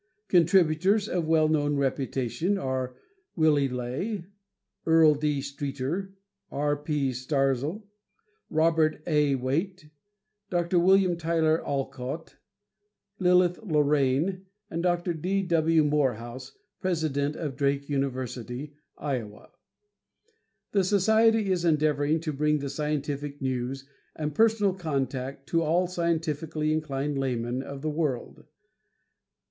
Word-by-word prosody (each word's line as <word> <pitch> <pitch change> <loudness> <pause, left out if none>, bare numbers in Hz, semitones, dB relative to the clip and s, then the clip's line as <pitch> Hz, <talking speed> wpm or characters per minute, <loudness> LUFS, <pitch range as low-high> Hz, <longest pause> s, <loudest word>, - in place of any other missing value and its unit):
Contributors 185 +3 +4
of 175 -5 -1
well 160 -1 +4
known 145 -2 +1
reputation 135 - -1
are: 130 -5 -3 0.4
Willy 150 -4 +3
Ley, 135 - -3 0.6
Earl 160 -1 +6
D. 150 -1 -1
Streeter, 140 +7 -4 0.3
R. 145 +1 0
P. 145 -2 -1
Starzl, 135 - -1 0.7
Robt. 160 0 +3
A. 150 -3 +2
Wait, 155 +6 -2 0.6
Dr. 175 0 +1
Wm. 185 0 +4
Tyler 160 -1 +1
Olcott, 135 +2 -4 0.8
Lilith 180 -1 +3
Lorraine 150 +1 +1 0.2
and 165 - -2
Dr. 175 0 0
D. 185 +5 -1
W. 165 -2 +3
Morehouse, 130 -3 -1 0.3
president 155 -5 -1
of 150 -5 -4
Drake 140 0 0
University, 130 0 -3 0.2
Iowa. 120 -8 -5 1.2
This 190 -3 +2
society 220 +1 +3
is 180 -2 0
endeavoring 155 -1 +2
to 155 -2 -3
bring 150 +2 +2
the 140 -2 -4
scientific 145 -1 -3
news 130 0 -3 0.3
and 150 -1 -3
personal 215 -1 +3
contact 135 -5 -3
to 165 - +2
all 165 +3 +2
scientifically 160 -3 -1
inclined 145 -2 -2
laymen 125 -1 -1
of 140 +1 -8
the 155 - -1
world. 150 -1 -3
150 Hz, 110 wpm, -27 LUFS, 135-170 Hz, 1.2 s, Earl